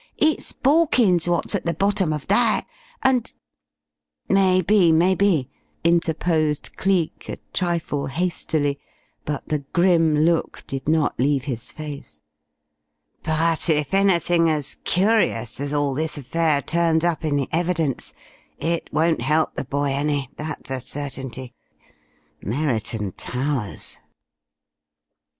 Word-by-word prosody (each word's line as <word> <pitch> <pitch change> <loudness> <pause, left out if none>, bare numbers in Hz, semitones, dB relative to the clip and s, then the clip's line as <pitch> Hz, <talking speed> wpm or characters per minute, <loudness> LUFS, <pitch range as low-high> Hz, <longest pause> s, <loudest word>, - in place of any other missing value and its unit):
It's 310 0 +1
Borkins 255 - +3
wot's 175 -2 0
at - - -2
the 170 - 0
bottom 195 -2 +1
of 150 -2 -3
that, 215 +3 +3 0.4
and 260 -3 +2 0.5
" 75 0 -64
"Maybe, 185 -1 +4
maybe," 170 -4 +2 0.3
interposed 160 -2 +1
Cleek, 185 -4 -1
a - - -4 0.2
trifle 165 -5 -1
hastily, 155 -2 -1 0.5
but 150 -2 -4
the 150 - 0
grim 170 -4 +3
look 165 +2 +1
did 135 0 -6
not 155 -2 +1
leave 135 0 +2
his 125 -5 -5
face. 145 - -8 1.0
"But 165 +1 +1
if 150 -1 +1
anything 175 -4 +3
as 150 -3 -1
curious 185 - +1
as 140 0 -3
all 145 -2 0
this 155 +3 -2
affair 145 +1 0
turns 165 -1 +1
up 170 -2 0
in 150 -2 0
the 140 -2 0
evidence 165 -5 -1 0.4
it 165 +2 -2
won't 160 +2 +1
help 155 +1 +1
the - - -3
boy 140 +1 -1
any, 140 -1 -1
that 155 +1 -5
is 130 - 0
a - - -6
certainty.... 130 -3 -6 0.9
Merriton 110 -5 -2
Towers!" 125 0 -4
155 Hz, 125 wpm, -22 LUFS, 140-175 Hz, 1.0 s, Maybe